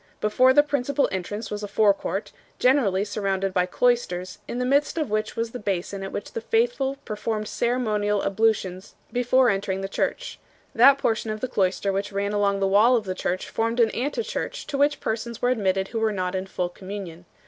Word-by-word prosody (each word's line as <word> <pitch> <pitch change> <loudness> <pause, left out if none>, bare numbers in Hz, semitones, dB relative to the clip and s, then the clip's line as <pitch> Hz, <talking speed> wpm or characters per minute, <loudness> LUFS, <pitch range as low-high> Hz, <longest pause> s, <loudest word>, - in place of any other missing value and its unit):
Before 255 +5 +4
the 290 +3 +6
principal 280 -1 0
entrance 205 +4 -4
was 210 0 -4
a 205 - -4
forecourt, 200 -1 +1 0.3
generally 225 -7 +3
surrounded 195 -2 -1
by 180 -1 +2
cloisters, 185 -5 0
in - - -4
the 250 - -1
midst 285 +5 +2
of 305 -9 -1
which 215 0 -1
was 230 0 -2
the 250 - -6
basin 195 -1 -3
at 195 - -5
which - - -5
the 230 - -3
faithful 450 - +1
performed 215 0 -3
ceremonial 210 -5 0
ablutions 195 -2 0 0.2
before 245 0 +3
entering 195 -1 -2
the 195 - -3
church. - - -3 0.3
That 270 +4 +7
portion 225 -4 -1
of 215 0 -3
the 255 - -2
cloister 195 -2 0
which 200 +2 -2
ran 200 +1 -1
along 200 -1 +1
the 195 - +3
wall 215 +6 +5
of 225 -3 0
the 185 - -2
church 185 0 -3
formed 230 +2 -1
an 230 -2 +4
ante 290 - -2
church - - -4
to 285 - -3
which 290 +1 +2
persons 225 +1 -3
were 245 - +2
admitted 195 -5 0
who 230 - -3
were 220 -1 +1
not 185 -3 -2
in 190 0 -3
full 180 -2 -2
communion. 185 -2 -8
210 Hz, 200 wpm, -24 LUFS, 195-245 Hz, 0.3 s, That